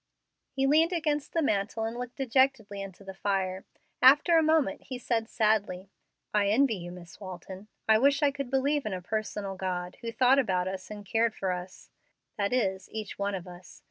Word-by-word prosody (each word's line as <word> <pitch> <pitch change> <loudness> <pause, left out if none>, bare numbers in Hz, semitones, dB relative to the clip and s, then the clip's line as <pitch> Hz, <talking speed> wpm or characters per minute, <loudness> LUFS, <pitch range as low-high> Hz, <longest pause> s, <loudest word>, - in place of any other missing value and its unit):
He 270 - -1
leaned 315 +5 +4
against 300 -4 -1
the 330 - +1
mantel 215 -2 0
and 225 +1 -3
looked 245 0 -6
dejectedly 260 -6 +1
into 195 0 -9
the 195 0 -8
fire. 190 -1 -2 0.4
After 290 +6 +7
a 325 - +6
moment 310 -2 +2
he 255 - -5
said, 230 -2 -1
sadly, 205 -4 0 0.4
"I 205 -1 +3
envy 235 +4 +3
you, 175 -3 -6
Miss 175 -1 -12
Walton. 190 +1 -9 0.2
I 220 0 +6
wish 280 +3 +3
I 285 - +4
could 275 -2 -5
believe 275 0 +1
in 210 - -2
a 185 - -4
personal 210 -1 -3
God 180 -1 -4
who 230 - -4
thought 255 +3 +4
about 185 -7 +1
us 190 0 -5
and 205 -1 -8
cared 225 +2 +1
for 190 -1 -1
us 180 +1 -7 0.4
that 200 -1 -1
is, 190 -6 0
each 215 -2 -6
one 200 0 -1
of 185 -1 -6
us. 180 0 -12
215 Hz, 195 wpm, -29 LUFS, 190-265 Hz, 0.4 s, After